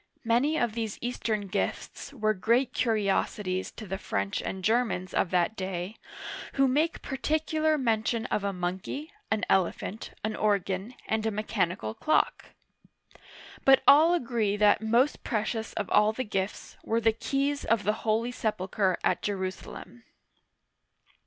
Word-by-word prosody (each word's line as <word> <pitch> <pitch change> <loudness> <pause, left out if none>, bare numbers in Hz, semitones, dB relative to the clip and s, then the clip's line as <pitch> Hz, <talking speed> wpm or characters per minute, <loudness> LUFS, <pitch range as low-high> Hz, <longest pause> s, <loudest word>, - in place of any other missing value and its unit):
Many 250 +7 +2
of 235 -3 0
these 225 -2 -3
Eastern 230 -3 -2
gifts 195 +7 -3
were 215 -6 +1
great 230 +6 +1
curiosities 200 -4 0
to 215 - -8
the 195 0 -4
French 100 0 -2
and 190 -1 -5
Germans 220 -5 +1
of 175 - +1
that 180 +4 +1
day, 185 +1 -4 0.6
who 275 -1 +4
make 300 +6 +1
par 270 - -4
ticular 310 +1 +1
mention 230 -1 0
of 205 - 0
a 200 - 0
monkey, 185 - -4 0.2
an 220 - 0
elephant, 190 +3 0
an 215 0 -1
organ, 200 +2 0
and. 220 0 0
a - - +3
mechanical 195 - -1
clock; 310 - +1 1.2
but 270 -1 +6
all 320 +5 +7
agree 230 -9 0
that 210 0 +4
most 235 +6 +2
precious 220 -1 -2
of 205 - -3
all 210 +1 +4
the 255 - -2
gifts 195 -3 -4
were 225 - +1
the 225 -1 +3
keys 280 +5 -1
of 225 -2 +1
the 210 +2 +2
Holy 225 +2 +1
Sepulcher 195 -4 0
at - - +1
Jerusalem. 195 +4 -5
220 Hz, 145 wpm, -28 LUFS, 195-245 Hz, 1.2 s, all